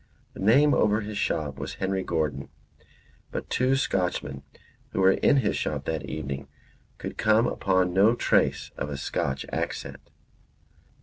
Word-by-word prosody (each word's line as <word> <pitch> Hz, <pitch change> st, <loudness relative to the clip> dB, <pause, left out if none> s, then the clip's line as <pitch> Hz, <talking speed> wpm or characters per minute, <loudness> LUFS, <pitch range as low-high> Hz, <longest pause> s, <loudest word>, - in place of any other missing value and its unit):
The -, -, -12 dB
name 135 Hz, +9 st, +5 dB
over 105 Hz, +1 st, +3 dB
his 105 Hz, -1 st, -5 dB
shop 70 Hz, -3 st, -1 dB
was 70 Hz, -, -5 dB
Henry 95 Hz, 0 st, -1 dB
Gordon, 75 Hz, -5 st, -2 dB, 0.8 s
but -, -, -6 dB
two 130 Hz, +1 st, +2 dB
Scotchmen 90 Hz, -, -1 dB, 0.5 s
who -, -, -1 dB
were 95 Hz, 0 st, +6 dB
in 140 Hz, -, +3 dB
his 115 Hz, -6 st, +1 dB
shop 75 Hz, -2 st, -2 dB
that 80 Hz, -4 st, -2 dB
evening 70 Hz, -1 st, -5 dB, 0.5 s
could -, -, -7 dB
come 110 Hz, +2 st, +4 dB
upon 95 Hz, -5 st, +1 dB
no 105 Hz, +5 st, +5 dB
trace -, -, +1 dB
of 75 Hz, -, -3 dB
a 70 Hz, -, -4 dB
Scotch 70 Hz, 0 st, -2 dB
accent. -, -, -4 dB
95 Hz, 145 wpm, -26 LUFS, 70-105 Hz, 0.8 s, were